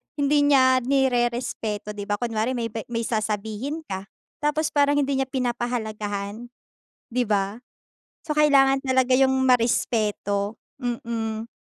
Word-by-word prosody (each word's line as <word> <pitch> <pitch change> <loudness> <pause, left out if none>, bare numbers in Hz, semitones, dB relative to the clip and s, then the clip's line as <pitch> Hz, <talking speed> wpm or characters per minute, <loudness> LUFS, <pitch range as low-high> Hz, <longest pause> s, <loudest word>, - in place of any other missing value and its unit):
hindi 290 0 +2
niya 260 -2 +5
nirerespeto, 240 -5 0
di 205 -1 -6
ba? 205 - +1
Kunwari 230 +1 -1
may 235 -2 -2
ba 225 0 -6
may 230 -1 -2
sasabihin 220 +6 -2
ka, 190 0 -4 0.3
tapos 300 +1 0
parang 285 0 +3
hindi 275 -1 0
niya 270 - 0
pinapahalagahan, 230 -4 -3 0.6
di 250 +1 0
ba? 200 -1 0 0.7
So 305 - -1
kailangan 275 -3 +4
talaga 260 -1 +2
yung 265 0 +4
marespeto. 215 -4 +1 0.2
Mm. 230 -2 -3
240 Hz, 125 wpm, -24 LUFS, 215-270 Hz, 0.7 s, niya